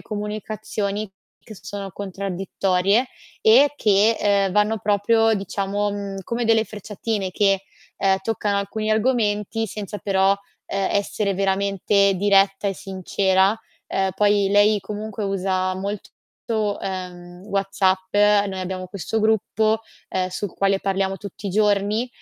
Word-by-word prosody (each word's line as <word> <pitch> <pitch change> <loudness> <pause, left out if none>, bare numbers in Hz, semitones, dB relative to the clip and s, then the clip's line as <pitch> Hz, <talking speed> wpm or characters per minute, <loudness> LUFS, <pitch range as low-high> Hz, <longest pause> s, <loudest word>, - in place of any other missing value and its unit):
comunicazioni 210 0 -4 0.4
che 215 - -11
sono 200 -1 -6
contraddittorie 195 +2 0 0.3
e 260 +7 +6
che, 215 -2 +3 0.3
uhm, - - -6
vanno 210 +2 +2
proprio 215 +3 +2
diciamo, 200 0 -2
mhmm, 200 -1 -5
come 235 +5 -2
delle 225 -1 +3
frecciatine 210 -1 -4
che, 195 0 +2 0.3
uhm, 190 0 +2
toccano 205 -2 -1
alcuni 215 +2 -3
argomenti 220 -1 +1
senza 210 0 -6
però, 195 +1 +2 0.3
ehm, 195 -1 -1
essere 200 0 0
veramente 195 +1 +2
diretta 195 +1 +3
e 195 - -2
sincera. 190 +2 +1 0.3
Uhm, 190 0 0
poi 205 0 +3
lei 205 +1 +4
comunque 210 +1 -6
usa 185 -1 0
molto 200 +2 -4 0.4
uhm, 185 -5 -4
WhatsApp, 195 -2 0
noi 205 -2 +3
abbiamo 185 0 -4
questo 200 +3 -3
gruppo, 220 0 +1 0.3
ehm, 185 0 -1
sul 185 +1 -4
quale 195 0 +2
parliamo 195 0 -1
tutti 200 +1 -9
i - - -2
giorni, 210 +3 +1
200 Hz, 125 wpm, -22 LUFS, 195-210 Hz, 0.4 s, e